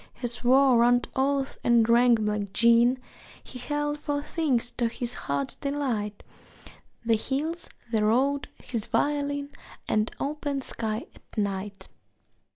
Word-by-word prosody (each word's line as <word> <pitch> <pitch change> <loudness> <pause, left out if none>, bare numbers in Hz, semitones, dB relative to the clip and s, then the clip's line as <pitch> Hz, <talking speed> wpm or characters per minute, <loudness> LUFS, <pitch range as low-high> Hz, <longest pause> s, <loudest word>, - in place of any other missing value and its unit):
He - - -6
swore 250 +1 +4
round 245 +1 +3
oaths 275 0 0
and 235 -2 +4
drank 235 0 +5
black 210 -2 -2
gin; 235 +3 +5 0.5
He 250 - -9
held 295 +3 -2
four 290 -1 -2
things 265 -8 0
to 240 -1 0
his 235 +1 -3
heart's 140 - -2
delight: 250 -8 -3 0.8
The 230 - +3
hills, 295 +9 -2 0.2
the 220 -2 +2
road, 270 +6 +2 0.2
his 230 -4 -3
violin, 285 -1 0 0.4
An 215 0 +1
open 285 -1 -2
sky 220 -3 -3
at - - -21
night. 200 -1 -3
245 Hz, 130 wpm, -27 LUFS, 220-280 Hz, 0.8 s, drank